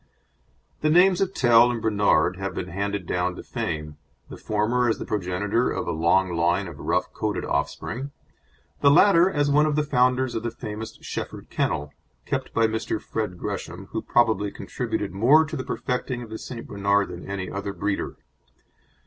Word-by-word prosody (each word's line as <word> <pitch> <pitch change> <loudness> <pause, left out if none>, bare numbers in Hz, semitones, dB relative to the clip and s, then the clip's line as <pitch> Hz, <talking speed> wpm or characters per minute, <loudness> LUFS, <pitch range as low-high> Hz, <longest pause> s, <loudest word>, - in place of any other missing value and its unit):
The 155 - +2
names 180 +3 +5
of 190 -1 +1
Tell 120 -1 +6
and 120 -1 -2
Bernard 100 -5 +2
have 95 0 -4
been 90 - -4
handed 100 +1 -3
down 90 +1 -1
to - - -8
fame, 75 -2 -4 0.3
the - - -8
former 115 +4 +1
as 115 - +1
the - - -6
progenitor 100 +4 0
of - - -3
a - - 0
long 85 +2 +2
line 85 +4 +1
of 85 -4 -10
rough - - -1
coated - - -2
offspring; 125 - -2 0.7
the 140 - +5
latter 175 +3 +6
as 145 -5 +1
one 150 +2 +4
of 150 - 0
the 150 - +2
founders 125 -2 +2
of 115 - -2
the 120 - -2
famous 110 -1 -7
Shefford - - -6
Kennel, 75 +1 -1 0.3
kept - - -3
by 115 - +3
Mr. 110 0 -1
Fred 105 -5 -4
Gresham, - - -6
who - - -2
probably 110 -4 +2
contributed - - -4
more 130 - +5
to 155 - -6
the 130 - -3
perfecting 125 -1 -3
of 110 - -12
the 110 - -5
St. 120 -2 -7
Bernard 100 0 +1
than 85 - -8
any 95 -2 -4
other 100 0 -4
breeder. 100 +2 -2
110 Hz, 180 wpm, -25 LUFS, 95-125 Hz, 0.7 s, Tell